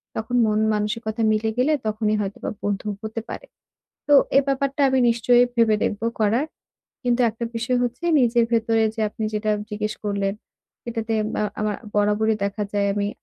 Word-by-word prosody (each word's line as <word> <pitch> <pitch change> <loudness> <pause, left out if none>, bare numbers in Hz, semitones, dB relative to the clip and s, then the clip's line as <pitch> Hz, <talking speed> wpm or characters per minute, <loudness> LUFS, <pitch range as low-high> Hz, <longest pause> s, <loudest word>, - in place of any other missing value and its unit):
তখন 230 +3 -3
মন-মানসিকতা 215 +1 0
মিলে 215 +1 +1
গেলে 275 +5 +3
তখনই 215 0 0
হয়তোবা 200 0 -4
বন্ধু 205 0 -2
হতে 220 +1 -5
পারে। - - -7 0.6
তো 290 - +4 0.2
এ - - +9
ব্যাপারটা 275 +1 0
আমি 265 0 +2
নিশ্চয়ই 240 +1 +4
ভেবে 230 -2 +4
দেখব 205 - -2 0.2
করার। 220 +6 +2 0.6
কিন্তু 245 -1 +1
একটা 230 +2 -6
বিষয় 245 +2 0
হচ্ছে 245 +7 -3 0.2
নিজের 240 -1 +3
ভেতরে 225 -1 +2
যে 225 - -5
আপনি 215 +1 -5
যেটা 215 0 0 0.2
জিজ্ঞেস 210 0 -3
করলেন। 200 -1 0 0.6
এটাতে 225 -1 -2 0.2
মা - - 0 0.2
আমা 215 0 0 0.2
বরাবরই 210 +1 +2
দেখা 200 +1 -2
যায় 200 -1 +1
আমি 205 0 -1
220 Hz, 160 wpm, -23 LUFS, 210-235 Hz, 0.6 s, এ